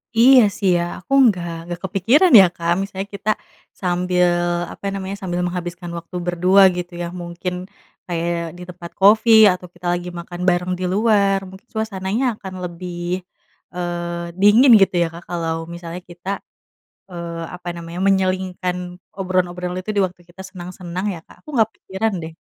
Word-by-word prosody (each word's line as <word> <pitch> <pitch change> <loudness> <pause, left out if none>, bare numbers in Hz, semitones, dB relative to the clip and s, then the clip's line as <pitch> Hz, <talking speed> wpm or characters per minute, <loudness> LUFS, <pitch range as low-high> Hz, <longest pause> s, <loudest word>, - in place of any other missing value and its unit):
Iya, 250 +3 +8 0.2
sih, 195 -3 +1
ya, 170 - 0 0.2
aku 185 - -6
nggak 180 -7 +1 0.2
nggak 175 0 -6
kepikiran 225 - +3
ya, 190 - +9
Kak, 170 0 -1
misalnya 195 0 -5
kita 205 - -3 0.5
sambil, 180 0 +2 0.4
apa - - -11
namanya, 195 0 -4
sambil 180 -2 -2
menghabiskan 175 -1 -4
waktu 170 +2 -9
berdua, 180 +3 +4 0.2
gitu 175 0 -5
ya. 175 - -2
Mungkin 175 +1 -5 0.5
kayak 170 -1 -2
di 180 - -9
tempat 175 -1 -9
kopi 215 +4 +5 0.2
atau 180 0 -5
kita 175 +1 -15
lagi 175 0 -3
makan 175 +1 -8
bareng 180 +1 0
di 185 - -2
luar, 200 -2 +3
mungkin 190 +5 -14
suasananya 220 +2 -2
akan 190 -1 -8
lebih, 175 +1 -4 0.6
eee, 175 -1 -3
dingin, 220 +6 +6
gitu 190 - +3
ya, 170 - 0
Kak, 170 +1 -10
kalau 165 -1 -3
misalnya 170 +1 -7
kita, 175 +2 -8 0.8
eee, 170 -2 -6
apa 180 0 -12
namanya, 170 +1 -7
menyelingkan 185 -2 0 0.4
obrolan-obrolan 180 -1 -1
itu 185 +4 -4
di 200 - +3
waktu 180 -1 -3
kita 185 +2 -11
senang-senang 180 0 -6
ya, 165 - -9
Kak. - - -18
Aku 305 - -13
nggak 220 -2 +4
kepikiran, 205 +2 -3
deh. 160 0 -8
180 Hz, 160 wpm, -20 LUFS, 175-195 Hz, 0.8 s, ya